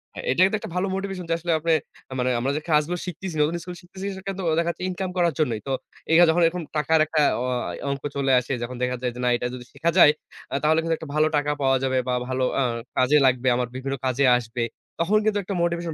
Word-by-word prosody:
হ্যাঁ। - - -7
এটা 175 - +2
কিন্তু 215 +3 +1
একটা - - -8
ভালো 185 +2 0
মোটিভেশন 195 -2 -4
যে - - +2
আসলে 170 0 -2
আপনে 165 +1 0 0.4
আ - - -4
মানে 125 +1 +1
আমরা 135 +3 0
যে - - -3
কাজগুলো 155 +3 +2
শিখতেছি, 180 -1 -6
নতুন 155 +3 +1
স্কুল 180 -1 -7
শিখতেছি 190 +2 -9
সেখানে 195 0 -5
তো - - -3 0.2
দেখা 170 0 0
যাচ্ছে 180 - -9
ইনকাম 185 0 -3
করার 170 -3 +2
জন্যই। 120 -8 +1
তো - - -2 0.4
এই - - +5
হা - - +9
যখন 175 +2 +3
এরকম 170 +1 0
টাকার 155 +2 +3
একটা 155 0 -1 0.2
অ - - -1 0.5
অংক 140 -1 -4
চলে 135 -1 +1
আসে 125 +2 -4
যখন 125 +1 -5
দেখা 125 0 0
যায় 125 -1 -1
যে - - -8
না - - +3
এটা 120 - -2
যদি 125 -1 -8
শিখা 170 - 0
যায় 150 - +9 0.4
আ - - -6
তাহলে 160 +1 +4
কিন্তু 165 0 0
একটা 160 - -9
ভালো 155 +1 +4
টাকা 145 0 0
পাওয়া 135 -1 +3
যাবে 130 -1 +1
বা 125 - +1
ভালো 130 0 -1 0.2
আ - - +3 0.4
কাজে 130 +4 +4
লাগবে, 130 0 +2
আমার 125 -1 -1
বিভিন্ন 135 +1 -3
কাজে 130 +2 +1
আসবে। 115 0 -4 0.4
তখন 195 +6 +3
কিন্তু 210 -1 +2
একটা 195 +1 -4
মোটিভেশন 170 -1 -1
155 Hz, 250 wpm, -24 LUFS, 130-175 Hz, 0.5 s, হা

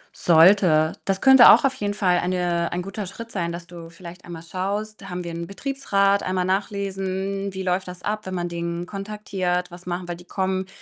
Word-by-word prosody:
Sollte. 165 -2 +5
Das 195 0 -1
könnte 265 -2 +9
auch 295 - +7
auf 270 - +2
jeden 205 -5 -3
Fall 180 -4 +2
eine 175 -1 -1
ein 175 +1 -2
guter 195 +1 -6
Schritt 230 +5 -9
sein, 170 -3 -2
dass 170 0 -7
du 170 -1 -11
vielleicht 170 +1 -12
einmal 170 -2 -8
schaust: 200 +4 -4
„Haben 180 0 -4
wir 170 -1 -6
'nen 170 0 -5
Betriebsrat“, 200 -4 0
einmal 185 -1 -1
nachlesen, 195 0 -2
„wie 190 0 -5
läuft 185 0 -1
das 180 0 -9
ab, 215 -1 -3
wenn 185 - -4
man 175 -1 -2
den 170 0 -4
kontaktiert? 195 -3 -3
Was 175 +1 -12
machen 175 0 -4
wir?“ 175 - -3
Die 175 +1 -12
kommen 190 0 -2
185 Hz, 200 wpm, -23 LUFS, 175-200 Hz, -, könnte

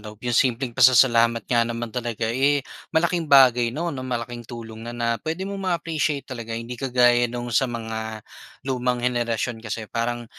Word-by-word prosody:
loob 105 0 -10
yung 120 - -1
simpleng 125 +1 +1
pasasalamat 115 -2 +5
nga 120 -1 +1
naman 115 -1 -4
talaga, 120 -2 -3
eh, 140 +2 +2 0.3
malaking 170 -1 +1
bagay, 125 -4 +6
'no, 165 +7 -3
na 130 - -5
malaking 120 -2 -5
tulong 115 -1 -8
na 120 - -6
na 120 -1 -1
puwede 165 +4 -3
mong 195 -1 -4
ma-appreciate 160 -4 -1
talaga. 115 -3 -6
Hindi 115 +1 -7
kagaya 120 -2 +3
nung 120 0 -5
sa 130 +4 +2
mga 110 -2 -5 0.4
lumang 125 -2 -1
henerasyon 120 -1 -1
kasi 110 0 -5
parang 120 0 -2
120 Hz, 170 wpm, -23 LUFS, 115-130 Hz, 0.4 s, bagay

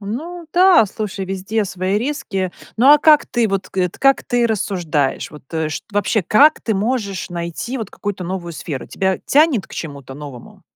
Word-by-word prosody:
Ну 320 - -6
да, 360 - +6
слушай, 200 -1 -5
везде 195 +3 -2
свои 190 +1 -1
риски. 215 - -3 0.2
Но, 265 +6 +7
а 295 - +7
как 300 0 +5
ты 235 -3 0
вот, 195 -1 -2
кыт 180 -2 -2
как 275 0 +4
ты 245 -1 +1
рассуждаешь? 175 -10 -1
Вот, 150 -2 -12
э, 160 -1 -1
чт - - -5
Вообще, 205 0 +1
как 285 - +5
ты 220 - -1
можешь 200 -4 -2
найти 170 +9 -4
вот 215 -3 -5
какую-то 205 -2 -5
новую 175 -1 -4
сферу? 145 -4 -6
Тебя 190 -1 -1
тянет 285 -8 +3
к - - -12
чему-то 140 -4 -7
новому? 140 -4 -11
200 Hz, 180 wpm, -19 LUFS, 175-245 Hz, 0.2 s, Но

